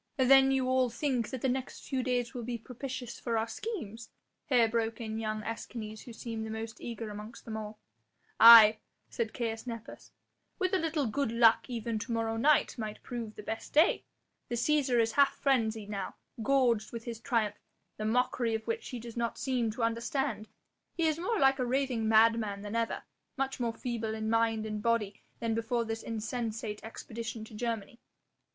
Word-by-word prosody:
"Then 270 0 +6
you 265 -1 +1
all 255 -1 +3
think 245 -2 -1
that 260 -3 -5
the - - +3
next 260 0 -3
few 265 -1 -1
days 245 -2 -1
will 245 - -4
be 235 +1 -3
propitious 250 +1 -7
for 230 -2 -1
our 220 +1 0
schemes?" 230 - -6 0.4
here 245 -4 +4
broke 225 0 -1
in 220 -1 -4
young 215 -1 -3
Escanes 220 -1 -6
who 240 - -9
seemed 225 -1 -5
the 220 - -5
most 220 0 -6
eager 230 -2 -5
amongst 210 +2 -9
them 220 - -5
all. 215 0 -6 0.6
"Aye!" 225 -2 +10 0.3
said 225 -2 -2
Caius 225 0 -4
Nepos, 230 -2 -8 0.5
"with 370 0 0
a 380 - +3
little 315 -4 0
good 235 +1 -1
luck 230 +1 +4
even 230 -2 -2
to 235 - -5
morrow 225 -1 0
might 230 -6 +2
prove 230 -3 -6
the 210 - -9
best 225 +2 -5
day. 315 +5 +4 0.5
The 240 - -1
Cæsar 260 0 +2
is 225 0 +2
half 280 +2 +4
frenzied 225 -6 0
now, 195 -2 -4 0.3
gorged 240 -4 +2
with 230 -1 -6
his 230 -2 -6
triumph, 225 -5 0 0.4
the 215 - -4
mockery 240 0 +1
of 220 - -4
which 460 0 -3
he 250 - -5
does 230 0 -9
not 235 -1 -2
seem 245 -1 0
to 230 +2 -3
understand. 230 0 -1 0.5
He 335 - +1
is 315 0 +1
more 425 +6 0
like 270 0 +4
a - - +2
raving 250 -3 0
madman 220 -2 +3
than 210 +2 -5
ever, 230 0 -1 0.3
much 270 0 -2
more 235 -2 0
feeble 225 -3 -3
in 220 0 -2
mind 225 -1 +2
and 215 -1 -4
body 215 -3 0 0.2
than 230 -1 -1
before 230 +1 0
this 225 0 -4
insensate 225 -1 -4
expedition 225 0 -6
to 220 - -14
Germany." 230 +2 -4
230 Hz, 185 wpm, -31 LUFS, 220-255 Hz, 0.6 s, Aye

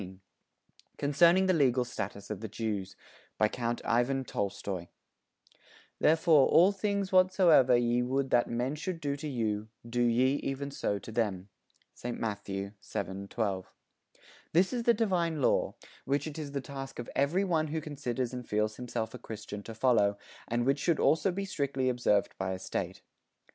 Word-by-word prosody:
_ 95 -1 -9 0.8
CONCERNING 170 +6 +4
THE 185 - +3
LEGAL 130 -6 +3
STATUS 105 -4 -6
OF 105 - -4
THE 110 - -5
JEWS 105 -3 -4 0.4
BY 110 - +4
COUNT 120 0 -2
IVAN 120 +3 +1
TOLSTOY 100 -4 -3 1.1
"Therefore 160 -2 +5
all 180 +4 +6
things 200 -1 -1
whatsoever 185 -9 +5
ye 120 0 +2
would 130 +2 -1
that 120 -1 +3
men 125 +4 -1
should 165 +3 -4
do 145 -2 -2
to 145 +2 -6
you, 110 -5 -2 0.2
do 120 +1 -1
ye 125 +3 +3
even 140 +1 -4
so 100 -6 -1
to 110 - -9
them." 105 -4 -1 0.4
(St. 120 0 -5
Matthew, 100 -2 -3
7, 100 0 -5
12.) 100 -4 -2 0.8
This 185 +8 +3
is 245 - 0
the 235 0 +4
divine 175 -8 0
law, 130 - +2 0.3
which 140 +1 0
it 155 0 -6
is 145 -2 -6
the 140 - -2
task 135 0 -7
of 120 - -5
every 150 +8 +2
one 165 -5 +1
who 160 +2 -2
considers 130 -5 -3
and 125 -1 -7
feels 105 0 0
himself 120 -2 -4
a 125 - -8
Christian 105 -2 -7
to 115 +2 -9
follow, 110 -4 +3 0.3
and 120 +1 0
which 140 +2 +2
should 170 0 +1
also 160 +4 +3
be 195 +2 -3
strictly 140 -7 -1
observed 120 -5 +1
by 95 0 -1
a - - -4
State. 95 0 -4
125 Hz, 170 wpm, -30 LUFS, 110-155 Hz, 1.1 s, all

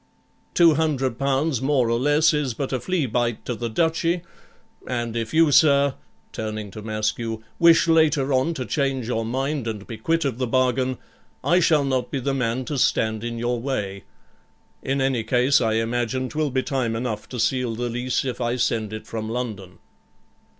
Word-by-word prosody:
Two 170 -2 +6
hundred 140 -6 0
pounds 140 0 0
more 135 -3 +2
or 115 - +1
less 145 +4 +3
is 145 -6 -1
but 135 +1 -3
a 130 - 0
flea 180 -2 -1
bite 120 -1 -1
to 125 - -2
the 120 0 -4
Duchy; 165 +6 0 0.6
and 120 -2 -3
if 115 -1 -3
you, 160 -1 +4
sir,' 140 -2 +5 0.4
turning 110 -2 -5
to 110 - -8
Maskew, 110 +1 -2 0.2
'wish 165 0 +6
later 155 -4 +3
on 130 +6 +1
to 130 -4 -4
change 135 +1 -1
your 115 -2 -1
mind, 135 +2 -2
and 105 -2 -4
be 115 - -7
quit 165 +6 0
of 130 -3 -2
the 125 - 0
bargain, 130 +1 +1 0.5
I 175 - +4
shall 155 -4 +3
not 130 -3 -1
be 140 - -2
the 135 +2 -1
man 125 -1 -1
to 145 0 -3
stand 110 -2 +1
in 120 0 -4
your 120 0 -1
way. 100 -8 -3 0.8
In 135 +1 -1
any 135 -4 +1
case, 125 +4 +3
I 110 -2 +1
imagine 120 +3 -1
'twill 155 -1 -1
be 130 0 0
time 125 -5 -1
enough 115 -2 -4
to 125 - -6
seal 125 0 0
the 120 +2 -2
lease 125 +3 -1
if 125 -2 -4
I 120 0 0
send 110 -3 -1
it 110 - -7
from 110 -1 -5
London.' 110 -7 -5
125 Hz, 185 wpm, -23 LUFS, 115-140 Hz, 0.8 s, Two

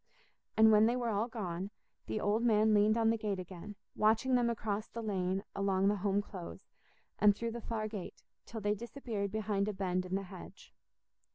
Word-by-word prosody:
And 220 0 +7
when 215 +1 +6
they 240 - +2
were 245 -2 -1
all 215 +1 0
gone, 195 -5 -4 0.4
the 215 - -2
old 210 +2 +1
man 220 -2 +4
leaned 210 +2 +4
on 225 -1 +4
the 225 - -1
gate 210 -2 -1
again, 185 +3 -8 0.2
watching 220 +5 +3
them 245 -1 +3
across 215 -2 -2
the 230 - -6
lane 190 -2 -1
along 195 0 +2
the 205 - +1
Home 200 +1 +1
Close, 185 -4 -9 0.5
and 205 -1 +6
through 230 +2 -3
the 235 +1 -6
far 220 -1 -3
gate, 210 -4 -7 0.2
till 225 -2 -6
they 205 +1 +1
disappeared 220 -3 -4
behind 210 -2 0
a 210 - -1
bend 185 -1 -1
in 185 - -2
the 195 - -1
hedge. 185 -1 -12
210 Hz, 195 wpm, -33 LUFS, 195-225 Hz, 0.5 s, And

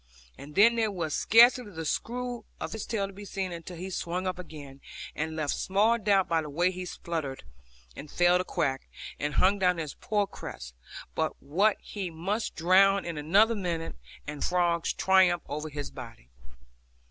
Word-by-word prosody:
And 150 +1 -12
then 230 +3 +6
there 220 -2 +2
was 170 -6 -3
scarcely 240 +1 +5
the 165 -4 -6
screw 245 +7 -3 0.2
of - - -4
his 220 - -5
tail 215 -4 -1
to 195 - -9
be 200 +2 -10
seen 195 -2 -4
until 170 +1 -8
he 185 +3 -6
swung 180 +1 -3
up 185 -1 -2
again, 145 -6 -10 0.3
and 160 +1 -3
left 155 -2 -1
small 215 +5 +2
doubt 200 -3 +3
by 165 -1 +1
the 150 - -7
way 175 +5 +1
he 185 0 -6
sputtered, 160 -7 -5 0.5
and 150 - -9
failed 175 +2 +3
to - - 0
quack, 140 -7 -2 0.3
and 145 0 -2
hung 195 +2 +3
down 180 -2 +3
his 155 -3 -4
poor 210 -1 0
crest, 65 - -9 0.4
but - - -2
what 195 +9 +2
he 195 -4 -5
must 190 +7 -3
drown 195 +4 +4
in 170 -1 -4
another 195 +10 +4
minute, 175 -6 -3 0.3
and 150 -1 -5
frogs 175 -2 +1
triumph 185 -3 +3
over 150 +2 -4
his 145 -1 -6
body. 115 - -11
180 Hz, 180 wpm, -28 LUFS, 155-200 Hz, 0.5 s, then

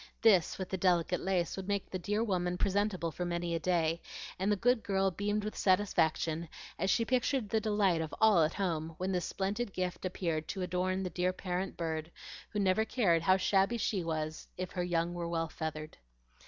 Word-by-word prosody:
This, 195 -7 +5
with 190 - -4
the 190 - -2
delicate 180 -1 +2
lace, 185 -3 0
would 190 -1 -6
make 200 -1 -1
the 185 - -3
dear 210 +4 0
woman 180 -4 0
presentable 195 -3 0
for 180 - -4
many 170 -1 -2
a 165 - 0
day, 165 -1 +1 0.4
and 195 +2 +1
the - - +4
good 245 +3 +2
girl 195 -2 +1
beamed 205 +3 -1
with 215 - -4
satisfaction 170 -4 +1 0.3
as 190 +3 +1
she 230 - +3
pictured 255 -2 +1
the 220 +1 +1
delight 205 -6 +2
of 160 -2 -4
all 215 -6 +6
at 155 +1 +1
home 165 -4 -2
when 185 +1 -2
this 180 -2 0
splendid 200 +2 -2
gift 180 -1 -3
appeared 170 -4 -2
to 190 - -3
adorn 185 +1 -1
the 180 - -3
dear 180 +2 +1
parent 185 +1 -3
bird, 160 -1 -3 0.4
who 210 - -5
never 200 +1 +3
cared 195 -9 +2
how 185 +2 +4
shabby 195 +4 +2
she 200 -4 0
was 155 -1 -3
if 185 0 -4
her 180 - -2
young 175 -1 0
were 175 -1 -3
well 165 -1 -1
feathered. 155 -1 -5
185 Hz, 200 wpm, -32 LUFS, 170-200 Hz, 0.4 s, all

